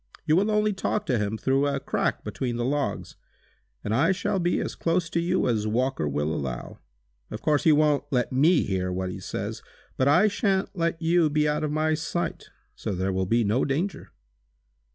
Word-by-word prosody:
You 155 - +3
will 200 +5 +2
only 210 0 +2
talk 210 +2 -2
to 125 -8 +1
him 105 +1 -2
through 135 +5 +1
a 140 -1 -1
crack 135 - -1
between 125 -3 -3
the 120 0 -1
logs, 145 +1 -2 0.7
and 105 - -2
I 145 +10 +3
shall 190 +1 -1
be 175 0 +1
as - - -3
close 165 0 -1
to 170 - +1
you 175 -1 +1
as 110 -3 0
Walker 120 - 0
will 75 +2 -1
allow. 65 -5 -5 0.5
Of - - -7
course 150 -2 +2
he 160 - +7
wont 150 -1 +3
let 125 -4 0
me 150 +6 +4
hear 95 -2 -2
what 90 0 -2
he - - -7
says, - - -5 0.4
but 130 - +2
I 175 +9 +5
shan't 195 -2 0
let 165 -1 -1
you 165 -1 +3
be 150 0 +1
out 150 +1 0
of 150 - -1
my 155 +1 +1
sight, 165 +2 -3 0.2
so - - -4
there 95 +1 -1
will 95 0 -1
be 115 +3 +2
no 110 +5 +1
danger!" 160 +8 -2
145 Hz, 200 wpm, -26 LUFS, 115-170 Hz, 0.7 s, he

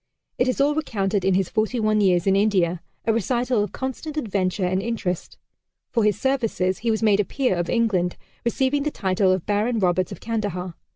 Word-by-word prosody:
It 250 - +3
is 255 - 0
all 285 +2 +3
recounted 205 - -1
in 190 0 +3
his 190 -1 +1
"Forty 220 +3 0
One 215 -1 +2
Years 180 -3 +3
in 195 -1 +3
India" 185 -4 +2 0.2
a 225 - +3
recital 240 0 +1
of 205 - -5
constant 270 +4 -5
adventure 195 -7 -1
and 185 +1 0
interest. 205 -6 -3 0.5
For 230 - +2
his 210 0 +2
services, 225 -9 0
he 235 - -1
was 220 0 0
made 210 -2 +4
a - - +4
peer 255 0 0
of 175 -1 -2
England, 200 -7 +1 0.3
receiving 265 +4 +1
the 300 - 0
title 190 -6 +1
of 185 -2 0
Baron 215 +4 +1
Roberts 185 -1 +1
of 195 - -7
Kandahar. 205 -6 -3
210 Hz, 195 wpm, -23 LUFS, 185-235 Hz, 0.5 s, made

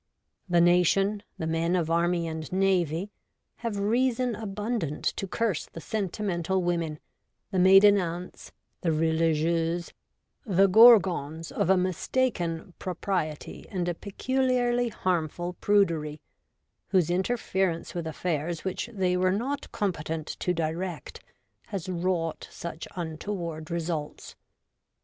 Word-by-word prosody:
The 175 -1 +4
nation, 180 +4 +3 0.2
the 160 - -3
men 165 +2 0
of 165 -2 0
Army 170 0 +1
and 160 -1 -5
Navy, 185 -1 +1 0.5
have 230 -4 -3
reason 245 +4 +1
abundant 210 - -3
to 195 - -4
curse 215 -3 -1
the - - -10
sentimental 190 -1 -2
women, 170 -3 -1 0.5
the 190 - +1
maiden 195 +2 +7
aunts, 175 0 -5 0.3
the 165 - +1
religieuses, 165 +1 +1 0.5
the 195 - +4
gorgons 185 -7 +5
of - - 0
a 190 - +5
mistaken 180 -2 -1
propriety 180 -4 -3
and 180 -3 -2
a 175 - 0
peculiarly 245 +4 0
harmful 175 -3 -2
prudery, 165 -7 +2 0.7
whose 180 -4 +2
interference 190 -3 -1
with 170 -2 -4
affairs 160 0 -2
which 190 +5 -3
they 185 -4 0
were 185 0 +2
not 260 +9 -2
competent 160 -5 -2
to 180 - 0
direct 170 +2 -3 0.5
has 195 -4 -5
wrought 175 -2 -2
such 170 -1 -7
untoward 165 -1 -5
results. 165 -3 -4
180 Hz, 115 wpm, -27 LUFS, 165-200 Hz, 0.7 s, maiden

